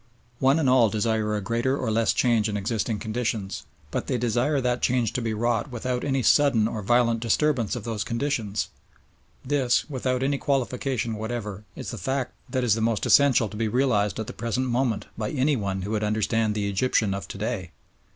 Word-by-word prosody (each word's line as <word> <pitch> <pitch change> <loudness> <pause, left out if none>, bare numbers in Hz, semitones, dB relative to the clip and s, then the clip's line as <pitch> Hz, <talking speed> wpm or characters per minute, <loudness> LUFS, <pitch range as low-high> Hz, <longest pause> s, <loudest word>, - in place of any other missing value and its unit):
One 135 +3 +4
and 155 -4 +1
all 125 -3 +5
desire 110 0 0
a 105 - -2
greater 120 +7 0
or 125 -5 -1
less 115 +1 +2
change 115 -3 +2
in 105 - -2
existing 110 +2 -1
conditions, 110 -3 -3 0.2
but - - -3
they 130 - 0
desire 120 +5 +1
that 125 -1 0
change 120 -3 +1
to 125 - -1
be 115 -1 -1
wrought 120 +6 0
without 125 0 -3
any 135 -2 0
sudden 120 -4 +4
or 110 -1 -4
violent 115 +2 +2
disturbance 120 0 +1
of 120 - -5
those 110 -2 -2
conditions. 115 -5 -2 0.8
This, 130 -3 +1
without 130 -1 -1
any 140 0 0
qualification 130 -3 -1
whatever, 105 -2 -5
is - - -6
the - - -6
fact 130 -1 -2 0.2
that 130 -2 -1
is 120 -4 +3
the 110 - -1
most 110 -2 0
essential 135 -5 +5
to 105 - -9
be 115 0 0
realised 105 -5 +1
at 110 - -2
the - - -7
present 120 +3 -2
moment 120 -3 0
by 105 - -1
anyone 120 -10 0
who 100 - -4
would 110 -1 0
understand 110 +1 +1
the 105 -1 -1
Egyptian 100 0 +1
of 100 - -5
to - - -7
day. 105 -4 -3
115 Hz, 195 wpm, -25 LUFS, 105-130 Hz, 0.8 s, all